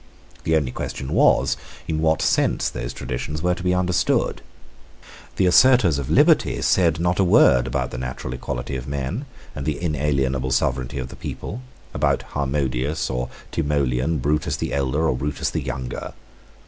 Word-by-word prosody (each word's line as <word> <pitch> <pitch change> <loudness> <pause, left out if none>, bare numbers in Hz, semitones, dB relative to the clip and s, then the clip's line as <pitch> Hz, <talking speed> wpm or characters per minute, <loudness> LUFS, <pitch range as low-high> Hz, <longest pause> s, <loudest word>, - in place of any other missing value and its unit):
The 80 - +2
only 70 -5 +1
question 65 +1 -5
was, 70 0 +4 0.3
in 80 -1 -1
what 80 0 +2
sense - - +2
those - - -5
traditions 65 +5 -5
were 90 0 +3
to 90 - -6
be 90 0 +1
understood. 90 -1 +1 0.9
The 95 - +2
assertors 95 - +5
of 70 - -5
liberty - - +4
said 85 -3 +3
not 90 +2 0
a - - +5
word 60 -8 +5
about 65 -2 -2
the 65 - -5
natural 65 0 -5
equality 65 +1 -4
of 65 - -7
men 70 - -3 0.3
and 70 - -5
the 75 +1 -2
inalienable 70 -5 0
sovereignty 65 0 0
of 65 -1 -4
the - - -10
people, 120 - -6 0.3
about - - +1
Harmodius 70 0 -1
or 60 -1 -2 0.2
Timoleon, 70 +1 0
Brutus 75 +1 0
the - - -3
elder 70 +3 +1
or 65 - +1
Brutus 70 +3 -2
the - - -2
younger. 65 -1 -5
70 Hz, 160 wpm, -22 LUFS, 65-80 Hz, 0.9 s, assertors